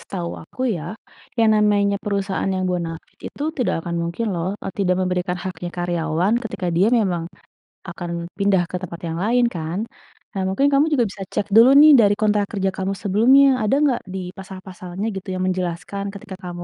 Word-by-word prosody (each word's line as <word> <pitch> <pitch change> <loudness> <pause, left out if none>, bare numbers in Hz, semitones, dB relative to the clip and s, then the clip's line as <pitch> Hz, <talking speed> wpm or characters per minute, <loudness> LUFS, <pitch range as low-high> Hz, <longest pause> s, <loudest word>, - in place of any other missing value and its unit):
setahu 85 - -5
aku 255 - -14 0.2
ya, 160 - -6 0.6
yang 225 -1 +5
namanya 205 -1 +3
perusahaan 200 -1 -1
yang 185 0 -1
bonafide 170 -2 -5
itu 285 - -5
tidak 250 - +1
akan 170 - -2
mungkin 170 +7 -3
loh, 170 +2 -2
eee, 195 - -5
tidak 185 -2 +2
memberikan 180 0 -1
haknya 175 -2 -5
karyawan 175 +1 0
ketika 205 -5 -4
dia 185 +4 +4
memang 180 -5 -1 0.7
akan 175 0 -6 0.3
pindah 200 -2 +3
ke - - -4
tempat 170 -2 -7
yang 165 0 -3
lain 245 +3 +3
kan. 165 +2 -3 0.6
Nah 195 - -1
mungkin 230 +9 +2
kamu 280 +2 +5
juga 245 -5 +3
bisa 195 - -10
cek 205 - -1
dulu 230 +3 +8
nih 305 0 +9
dari 205 -2 +4
kontrak 210 -1 +2
kerja 195 -2 0
kamu 190 +1 -1
sebelumnya. 230 +8 +5 0.2
Ada 215 +5 +2
nggak 270 -5 +2
di 190 - -3 0.2
pasal-pasalnya 185 0 -7
gitu 190 0 -7
yang 185 - -2
menjelaskan 185 +2 -3
ketika 195 -1 -9
kamu, 175 -1 -6
190 Hz, 180 wpm, -21 LUFS, 175-210 Hz, 0.7 s, nih